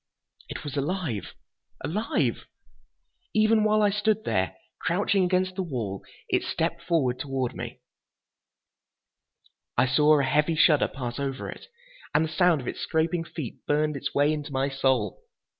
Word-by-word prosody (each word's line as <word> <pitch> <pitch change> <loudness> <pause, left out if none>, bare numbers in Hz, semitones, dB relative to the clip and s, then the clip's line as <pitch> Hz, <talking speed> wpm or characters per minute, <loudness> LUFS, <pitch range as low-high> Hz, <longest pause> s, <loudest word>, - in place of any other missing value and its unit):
It - - -6
was 145 -2 -5
alive! 140 - -2 0.5
Alive! 210 +8 -1 0.9
Even 215 0 +4
while 215 0 +3
I 205 - +4
stood 215 +1 +1
there, 95 - 0 0.2
crouching 195 +2 +2
against 185 +1 +1
the 190 - -2
wall, 115 - -4 0.2
it - - +2
stepped 170 +1 -2
forward 145 -8 +1
toward 135 -2 -2
me. - - -7 2.0
I - - +5
saw 150 +3 +5
a - - +2
heavy 150 +4 +2
shudder 155 -2 +5
pass 125 -2 -5
over 135 -1 -3
it, - - -11 0.5
and 155 +2 +4
the - - -5
sound 170 -2 +3
of 125 - -9
its - - -4
scraping 165 +1 0
feet 155 -7 -7
burned 150 0 +1
its 140 +1 -3
way 145 +2 +3
into 150 -1 -5
my 135 +1 0
soul. 130 -7 0
150 Hz, 150 wpm, -27 LUFS, 135-180 Hz, 2.0 s, I